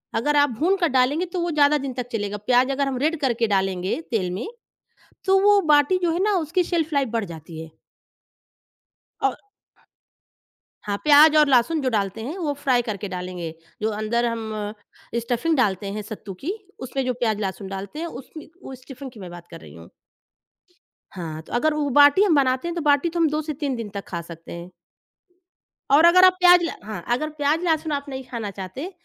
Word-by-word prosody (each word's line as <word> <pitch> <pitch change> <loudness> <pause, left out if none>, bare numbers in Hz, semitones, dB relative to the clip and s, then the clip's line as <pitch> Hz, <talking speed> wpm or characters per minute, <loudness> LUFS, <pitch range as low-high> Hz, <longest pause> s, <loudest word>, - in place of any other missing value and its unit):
अगर 295 +6 +1
आप 285 -1 +4
भून 370 +5 +3
कर 345 - +2
डालेंगे 265 +7 +2
तो 365 - -1
वो 345 - -1
ज़्यादा 295 -1 +4
दिन 270 -2 -5
तक 245 -1 -5
चलेगा। 205 -2 -3
प्याज़ 250 +5 +2
अगर 275 +1 0
हम 265 -2 -2
रेड 310 +5 0
करके 235 -4 +1
डालेंगे 190 - -1
तेल 190 -6 0
में, 185 - -4 0.8
तो 385 0 +4
वो 410 0 +5
बाटी 295 +6 +4
जो 345 - +2
है 345 +3 0
ना 415 0 +2
उसकी 345 +3 0
शेल्फ 330 -2 -1
लाइफ़ 275 -2 +1
बढ़ 230 -1 -1
जाती 160 0 -10
है। 160 - -11 1.5
औ - - +2 1.5
हाँ, 205 -1 -2
प्याज़ 300 +1 +7
और 300 -1 +6
लहसुन 270 +5 +3
जो 260 - 0
डालते 205 -2 -2
हैं, 295 +10 -5
वो 310 -6 -2
फ्राई 265 -3 +1
करके 210 -3 -5
डालेंगे। 180 -3 -5 0.3
जो 215 - +1
अंदर 215 +3 -1
हम 230 -2 -3 0.7
स्टफिंग 245 +8 -1
डालते 200 -5 +1
हैं 210 +1 -4
सत्तू 210 -1 -8
की, 355 +7 -1 0.3
उसमें 260 +1 -3
जो 255 - 0
प्याज़, 220 -3 -1
लहसुन 195 -1 -4
डालते 195 +8 -7
हैं, 335 - -3
उसमें 290 +2 -10
उ - - -9
स्टफिंग 260 +1 -10
की 235 - -14
मैं 185 -3 -8
बात 175 0 -11
कर - - -9
रही 75 -2 -13
हूँ। 85 0 -13 1.3
हाँ, 160 -3 -6
तो 160 - -13
अगर 310 +6 +2
वो 300 -1 -1
बाटी 290 +7 +7
हम 375 -6 +3
बनाते 260 +2 +1
हैं, 345 - -4
तो 340 - -2
बाटी 290 +2 +3
तो 340 +1 -4
हम 325 -2 +3
2 305 +1 -1
से 310 0 -5
3 280 -4 -1
दिन 230 -3 -6
तक 200 -1 -6
खा 170 -2 -4
सकते 165 0 -12
हैं। 170 +1 -8 1.2
और 300 +4 +7
अगर 365 +2 +7
आप 370 - +6
प्याज़ 355 -1 +7
ल 335 - -1
हाँ, 205 -4 -7
अगर 305 +5 -1
प्याज़ 300 +1 0
लहसुन 320 -1 0
आप 285 -1 -2
नहीं 265 -1 -6
खाना 230 -4 -4
चाहते, 195 - -7
260 Hz, 205 wpm, -23 LUFS, 205-310 Hz, 1.5 s, प्याज़